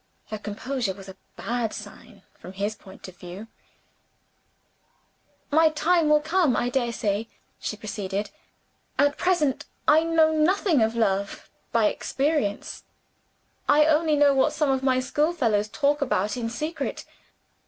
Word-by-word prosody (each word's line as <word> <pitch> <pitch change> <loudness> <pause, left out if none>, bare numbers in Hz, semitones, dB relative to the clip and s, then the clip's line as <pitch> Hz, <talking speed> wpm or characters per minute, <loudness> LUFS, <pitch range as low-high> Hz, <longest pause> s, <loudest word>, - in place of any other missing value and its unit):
Her 215 - -4
composure 215 0 -3
was 195 0 -12
a 190 - -10 0.2
bad 235 -2 -2
sign - - -11 0.2
from 185 - -10
his 200 +3 -2
point 190 -2 -13
of 185 -1 -13
view. 180 +5 -9 2.1
"My 320 +2 +5
time 315 +1 +2
will 300 0 +5
come, 320 -4 +2
I 245 - 0
daresay," 230 -4 -1 0.3
she 210 - -4
proceeded. 205 -1 -4 0.7
"At 285 0 +3
present 330 -7 0 0.2
I 315 - +6
know 325 -1 +3
nothing 325 - +2
of 220 +1 +1
love, 200 -3 -1 0.2
by 230 -2 +3
experience; 270 -1 -1 0.9
I 300 +1 +6
only 310 0 +3
know 290 -1 +5
what 265 -1 +2
some 300 -2 +1
of 265 -1 0
my 260 -1 +2
schoolfellows 255 -7 +1
talk 290 +5 0
about 210 -6 0
in 235 -2 -3
secret. 305 +8 -4
255 Hz, 135 wpm, -25 LUFS, 210-305 Hz, 2.1 s, I